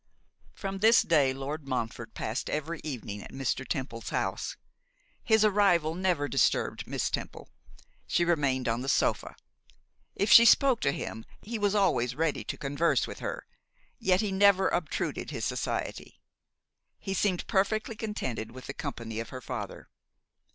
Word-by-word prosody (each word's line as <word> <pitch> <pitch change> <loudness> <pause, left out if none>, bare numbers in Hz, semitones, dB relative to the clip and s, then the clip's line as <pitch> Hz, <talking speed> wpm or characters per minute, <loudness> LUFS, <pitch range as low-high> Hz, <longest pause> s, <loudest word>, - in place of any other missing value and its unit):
From 195 -1 -5
this 225 +3 +6
day 145 -5 +3
Lord 140 +2 -5
Montfort 120 -3 -4
passed 110 +5 -3
every 155 +2 -3
evening 115 -8 -5
at - - -11
Mr. 135 -1 -2
Temple's 130 -6 -4
house. - - -2 0.7
His 220 -2 +4
arrival 190 -6 +3
never 175 -5 0
disturbed - - +1
Miss - - -1
Temple; - - -5 0.6
she 175 - +2
remained 140 -7 +1
on 115 +1 0
the 135 - -3
sofa. - - +1 0.8
If 205 +1 0
she 230 - +11
spoke 255 +1 +5
to 140 - +2
him 110 -5 -5 0.2
he 225 +1 -4
was 205 0 +1
always 125 - +2
ready 160 0 0
to - - -4
converse 145 +4 +1
with - - -8
her, - - -5 0.5
yet 185 0 +3
he 210 -2 -1
never 195 -1 +4
obtruded 175 -3 -2
his - - -3
society. - - -3 0.8
He 195 - -4
seemed 190 -2 0
perfectly 215 +2 0
contented 205 - -4
with 130 0 -10
the - - -5
company 115 -7 -5
of 115 - -5
her 130 - -7
father. 120 -6 -6
160 Hz, 150 wpm, -29 LUFS, 130-200 Hz, 0.8 s, she